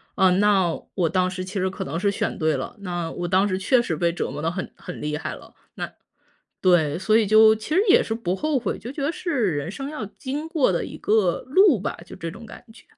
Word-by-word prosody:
呃， 190 - +5
那 195 -5 +3 0.2
我 180 -4 +2
当 185 +1 +1
时 185 -1 -5
其 185 - -9
实 190 -2 0
可 190 - -6
能 145 +4 -4
是 200 +3 +1
选 - - -2
对 155 -1 +1
了， - - -6
那 175 -3 -3
我 175 - -4
当 190 +3 +3
时 185 -2 -1
确 240 +6 +3
实 175 -9 -2
被 170 +2 +1
折 175 - -3
磨 145 +3 -6
得 165 +2 0
很 185 +2 -5
很 180 - -9
厉 150 0 -2
害 160 - -5
了。 - - -15 0.2
那 - - -4 0.7
对， 170 -5 +3
所 215 +4 +2
以 225 -2 +3
就 220 +1 +7
其 260 +9 -4
实 380 - +5
也 - - +6
是 225 - -4
不 190 -6 -2
后 305 +1 0
悔。 230 -5 -2
就 240 - -7
觉 285 - -5
得 285 - +1
是 255 - -1
人 145 +4 -3
生 270 +7 -6
要 300 -7 -5
经 275 +8 -5
过 315 - +2
的 170 - -1
一 - - -8
个 205 -5 +1
路 320 - +5
吧， 200 - -3
就 - - -11
这 165 - -5
种 230 - -11
感 225 - -12
觉。 220 - -18
195 Hz, 275 characters per minute, -23 LUFS, 175-235 Hz, 0.7 s, 就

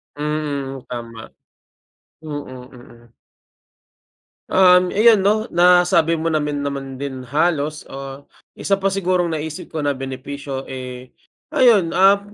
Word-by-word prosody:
Mm, 145 -3 -3
tama. 115 -2 -8 0.9
Mm, 155 -2 -6 0.3
mm. 120 -2 -17 1.4
Um, 180 -1 +5
ayun 220 0 +6
'no, 210 +3 +2
nasabi 175 -1 +4
mo 165 +1 -2
namin 150 -2 -1
naman 135 -1 -5
din 135 0 -6
halos, 155 +1 0
ah, 135 +1 -8 0.3
isa 195 -1 0
pa 195 - 0
sigurong 185 -2 0
naisip 155 0 -6
ko 155 -2 -5
na 145 - +1
benepisyo, 135 +1 -6
eh, 125 -1 -8 0.4
ayun, 210 -9 +4
um, 195 +2 +5
150 Hz, 115 wpm, -20 LUFS, 135-180 Hz, 1.4 s, ayun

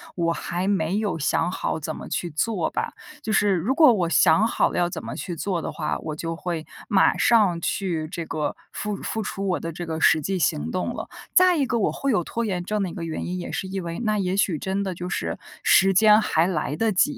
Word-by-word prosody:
我 170 -1 +1
还 175 +3 -3
没 190 -2 +1
有 205 -6 -1
想 165 +3 0
好 160 - -2
怎 155 +1 -4
么 - - -8
去 175 - -2
做 170 +3 -1
吧。 - - -3 0.3
就 215 - -1
是 205 -2 +3
如 190 +10 0
果 305 -2 +7
我 185 -7 +1
想 165 +5 +5
好 - - +2
了 - - -4
要 175 - +2
怎 - - -6
么 - - -6
去 175 - -5
做 175 +1 -2
的 - - -3
话， 155 - -2
我 155 -1 -5
就 165 +1 -4
会 165 -2 -4 0.2
马 200 -4 +3
上 210 -8 +4
去 170 -4 -2
这 170 +1 -5
个 150 -2 -2 0.2
付 210 -1 -3
付 220 +2 -3
出 195 0 -4
我 180 - 0
的 165 - -5
这 170 +1 -7
个 160 0 -3
实 160 - +4
际 190 +5 -1
行 155 -2 0
动 185 - -2
了。 - - -6 0.2
再 365 -1 +6
一 280 - +2
个 260 - -6
我 - - +2
会 275 - -1
有 210 - +2
拖 235 +6 -3
延 185 -5 -1
症 210 0 -1
的 190 - -2
一 - - -9
个 170 - -6
原 160 - -4
因， 180 +1 -3
也 175 - -6
是 - - -3
因 190 0 -4
为 170 0 -5
那 215 -2 0
也 185 -1 0
许 195 -5 +1
真 195 +1 -2
的 190 -2 -3
就 180 +1 -6
是 - - -2 0.3
时 195 0 +5
间 210 +2 +6
还 165 -5 +2
来 150 -5 -1
得 225 +5 +1
及， 255 +10 +2
185 Hz, 270 characters per minute, -24 LUFS, 165-210 Hz, 0.3 s, 果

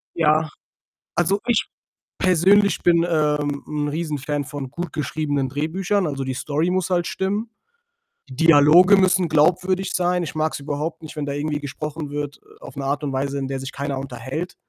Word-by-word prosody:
Ja. 155 -1 +2 0.7
Also, 190 +4 +2
ich 240 -3 +2 0.5
persönlich 190 +3 +4
bin, 170 -1 +4
ähm, 150 -3 0
'n 150 -1 -2
Riesenfan 150 -2 -2
von 140 -1 -6
gut 170 0 -5
geschriebenen 145 -2 -1
Drehbüchern. 175 +7 -1
Also, 140 -2 -3
die 130 0 -3
Story 150 +6 -1
muss 185 -1 0
halt 175 -2 +1
stimmen. 205 +4 -2 0.8
Dialoge 165 +6 +6
müssen 185 -2 +3
glaubwürdig 185 +5 +2
sein. 180 -1 +1
Ich 155 - -6
mag 155 0 0
es - - -4
überhaupt 150 +4 -4
nicht, 155 - -10
wenn 150 -1 -3
da 140 - -3
irgendwie 145 +1 -2
gesprochen 150 +1 -5
wird, 145 0 -4
äh, - - -23
auf - - -10
'ne 135 -1 -4
Art 145 +2 -1
und 145 - -2
Weise, 140 +1 -2
in 135 -1 -3
der 135 0 -3
sich 135 +1 -6
keiner 140 0 -3
unterhält. 135 +6 -5
155 Hz, 175 wpm, -22 LUFS, 145-175 Hz, 0.8 s, Dialoge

